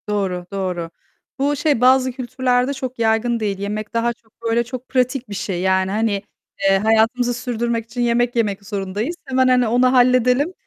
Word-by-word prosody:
Doğru, 190 -4 -1
doğru. 180 -4 -3 0.5
Bu 285 +2 +1
şey, 290 -4 +1
bazı 260 0 +4
kültürlerde 255 +1 0
çok 260 -2 -6
yaygın 230 +1 +1
değil. 205 -3 -2
Yemek 210 +2 -4
daha 235 +1 +1
çok, 225 -2 -34
böyle, 230 +1 +1
çok 250 +1 -8
pratik 255 -1 0
bir - - -6
şey. 195 -2 -3
Yani, 190 0 +1
hani, 210 -1 0 0.5
eee, 195 - +4
hayatımızı 225 +4 +2
sürdürmek 235 -1 -2
için 245 +1 -5
yemek 240 0 +1
yemek 205 -4 -1
zorundayız. 205 - -3
Hemen, 260 -1 +2
hani, 250 -2 +3
onu 250 +3 +3
halledelim, 250 +5 +3
235 Hz, 170 wpm, -20 LUFS, 205-255 Hz, 0.5 s, bazı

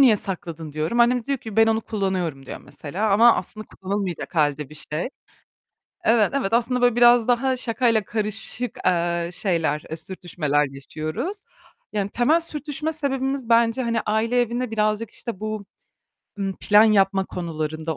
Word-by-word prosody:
niye 245 -6 +7
sakladın?" 165 -6 -4
diyorum. 155 +11 0
Annem 240 0 +3
diyor 275 -2 -1
ki; 220 -2 -9
"Ben 225 - +6
onu 225 0 +2
kullanıyorum." 185 - -3
diyor - - -7
mesela, 195 +8 -4
ama 230 +4 +6
aslında 215 -1 -6
kullanılmayacak 190 -2 -4
halde 150 -2 +1
bir 155 - -13 0.2
şey. 160 +9 -1 1.0
Evet 225 -2 +3
evet, 225 -6 -1
aslında 245 +1 +1
böyle 245 -1 +4
biraz 240 -1 +6
daha 255 +2 +2
şakayla 230 -3 +1
karışık, 220 +3 -2
eee, 170 -1 +1
şeyler, 165 -6 0
eee, 160 - -4
sürtüşmeler 155 -4 -1
yaşıyoruz, 155 - -5 0.6
yani 200 -2 -1
temel 245 +10 +3
sürtüşme 300 -1 -4
sebebimiz 270 -4 -2
bence 230 +2 +3
hani 230 -2 0
aile 225 +3 +1
evine 240 0 -2
birazcık 215 0 0
işte 235 -6 -7
bu, 215 -1 -4 0.7
ımm, 195 -1 -2
plan 210 +1 +6
yapma 195 -3 +3
konularında 160 -3 -4
215 Hz, 150 wpm, -23 LUFS, 175-240 Hz, 1.0 s, niye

